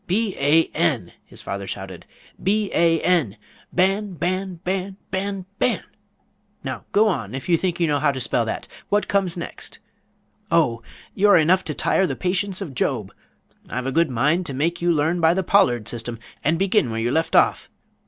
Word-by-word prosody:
"B 200 +2 0
a 150 +4 +5
n!" 145 - 0
his - - -11
father 100 0 -5
shouted, 95 -3 -7 0.3
"B 205 +1 +1
a 165 -1 +3
n, 160 - +1 0.3
Ban! 195 +2 +1
Ban! 185 +2 -2
Ban! 190 +1 -2
Ban! 195 0 -3
Ban! 250 - +1 0.8
Now - - -5
go 215 +2 +4
on, 125 - -2
if 135 - -6
you 175 - +4
think 175 +1 -1
you 170 - +3
know 145 -2 +1
how 145 0 +3
to 135 - -5
spell 120 -1 +1
that! 110 - -4 0.2
What 205 +1 +1
comes 190 -3 0
next? 170 - -8 0.7
Oh, 150 -9 +2 0.3
you're 200 -1 +5
enough 180 +4 +4
to 150 - -4
tire 190 - +2
the - - -3
patience 190 +1 -1
of 165 -8 -5
Job! - - -1 0.6
I've 125 0 -3
a 135 - -1
good 165 +2 +2
mind 150 +9 +1
to 135 - -3
make 165 +5 -1
you 175 0 +3
learn 165 +2 +1
by 165 +1 +4
the 190 - 0
Pollard 120 - +3
system, 120 0 -4 0.3
and 160 +3 +2
begin 195 - +2
where 115 0 -3
you 120 +2 0
leave 160 +3 0
off! - - +3
170 Hz, 185 wpm, -22 LUFS, 135-190 Hz, 0.8 s, a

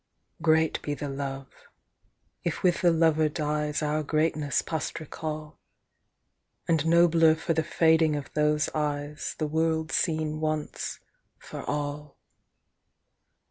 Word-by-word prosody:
Great 160 -1 +2
be 145 - -3
the 145 - -5
love, 135 -1 -5 1.0
if 170 - -3
with 180 -2 +3
the 175 - +5
lover 160 -2 +3
dies 150 0 -1
Our 150 +1 0
greatness 155 -1 0
past 160 -3 -3
recall, 155 0 -6 1.1
And 160 -2 +2
nobler 165 -1 +5
for 165 +1 -1
the 160 - +1
fading 160 -1 +3
of 145 -2 -6
those 150 0 +2
eyes 150 0 -3
The 155 - -1
world 160 +1 0
seen 155 -2 0
once 155 -1 -3 0.4
for - - -8
all. 145 0 -4
155 Hz, 120 wpm, -27 LUFS, 150-160 Hz, 1.1 s, the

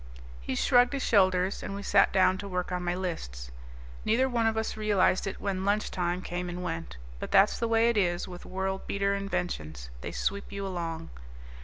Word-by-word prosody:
He - - -3
shrugged 245 - +4
his 275 - -1
shoulders, 185 -2 +3
and 195 - -5
we 200 - -6
sat - - +4
down 190 0 +3
to 200 - -5
work 180 -1 -3
on 180 0 -2
my 175 0 0
lists. 60 - -5 0.5
Neither 245 +4 +3
one 235 -3 +1
of 220 0 0
us 220 - -1
realized 210 -3 +2
it 195 - -4
when 190 -2 -2
lunch 205 +2 +1
time 180 0 -1
came 180 0 -3
and 175 +1 -5
went. 80 - -4 0.2
But - - -5
that's 195 +1 +4
the 230 - 0
way 225 0 +4
it 235 -2 +2
is 175 -3 +1
with 180 -1 -9
world 190 +1 -3
beater 200 0 +1
inventions; 175 - -3
they - - -5
sweep 200 +1 -2
you 200 0 -4
along. 165 -3 -4
190 Hz, 200 wpm, -29 LUFS, 175-205 Hz, 0.5 s, shrugged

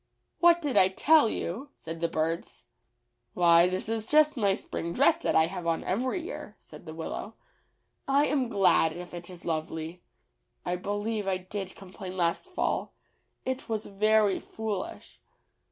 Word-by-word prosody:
"What 345 -1 +5
did 285 -4 0
I 185 - +8
tell 285 +7 +4
you?" 230 +13 -4
said 165 0 -7
the 170 - +2
birds. 165 +1 -3 0.7
"Why, 170 0 +6
this 185 +2 -3
is 225 0 -2
just 305 +1 +4
my 200 -6 +2
spring 170 -3 -5
dress 285 - +4
that 335 - -1
I 160 - +6
have 175 0 -5
on 165 -1 0
every 255 - -1
year," 350 - -7
said - - -14
the 160 - -6
Willow. 195 +6 -5 0.7
"I 280 +2 +4
am 270 -5 0
glad 195 -6 +3
if 175 +1 -9
it 175 0 -7
is 180 -2 -12
lovely. 160 +1 -3 0.6
I 180 - 0
believe 205 +3 -3
I 190 -1 +1
did 185 +1 -6
complain 185 0 -9
last 170 - 0
fall; - - -1 0.5
it 260 -1 -3
was 220 -1 -2
very 210 0 +2
foolish." 215 -4 -6
195 Hz, 160 wpm, -28 LUFS, 170-230 Hz, 0.7 s, I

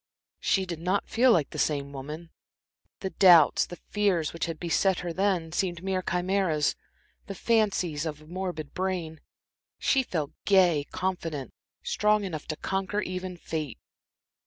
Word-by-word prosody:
She 190 -1 +1
did 170 -3 -5
not 185 +4 0
feel 250 +2 +4
like 160 -9 +2
the - - -5
same 140 -2 0
woman. 150 +5 -7 0.7
The 190 -2 -3
doubts, 175 -6 +6
the 175 - -8
fears, 190 -6 0
which 165 - -2
had 165 -2 -5
beset 180 +2 +1
her 175 -1 -4
then 185 -3 0
seemed 175 -1 -1
mere 190 -1 0
chimeras, 180 -4 +1 0.5
the 195 - -5
fancies 190 -9 +1
of 150 -1 -5
a 155 - -16
morbid 175 -3 -5
brain. 180 -4 -3 0.6
She 270 - +3
felt 160 - -3
gay, 175 -7 +4
confident, 175 -7 -3 0.3
strong 210 - +2
enough 160 -6 -5
to 155 - -2
conquer 195 +5 -2
even 185 -1 -5
fate. 155 -6 -4
180 Hz, 150 wpm, -28 LUFS, 160-190 Hz, 0.7 s, doubts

